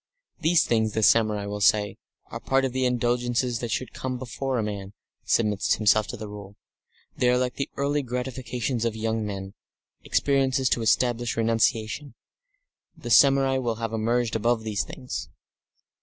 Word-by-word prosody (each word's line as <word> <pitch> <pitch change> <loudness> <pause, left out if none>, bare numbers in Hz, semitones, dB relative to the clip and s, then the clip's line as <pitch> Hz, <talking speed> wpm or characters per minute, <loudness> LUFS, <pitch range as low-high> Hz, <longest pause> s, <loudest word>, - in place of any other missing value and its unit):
These 170 +1 +3
things, 110 -2 +1
the 110 - 0
samurai 105 -1 +3
will 105 0 -5
say, 105 0 +2 0.3
are - - -5
part 135 0 +1
of 130 - -3
the 130 0 0
indulgences 120 0 0
that 120 - -4
should 130 +3 -3
come 130 -1 -4
before 130 +1 -3
a 110 - 0
man 100 -2 -5 0.3
submits 105 -3 +2
himself 105 0 +3
to 125 - -6
the 110 -1 -7
Rule; 100 -1 -10 0.6
they 125 - +2
are 125 - +3
like 125 0 0
the 140 - -4
early 145 +1 0
gratifications 125 -1 -3
of 115 -2 -1
young 110 0 -1
men, 100 -2 -5 0.5
experiences 135 -2 +1
to 120 - +1
establish 120 +1 +1
renunciation. 115 +4 0 0.8
The - - -6
samurai 135 -1 +5
will 120 -3 -1
have 115 0 -4
emerged 115 +1 0
above 115 +1 +1
these 110 -2 -1
things. 125 - -7
120 Hz, 160 wpm, -25 LUFS, 110-130 Hz, 0.8 s, samurai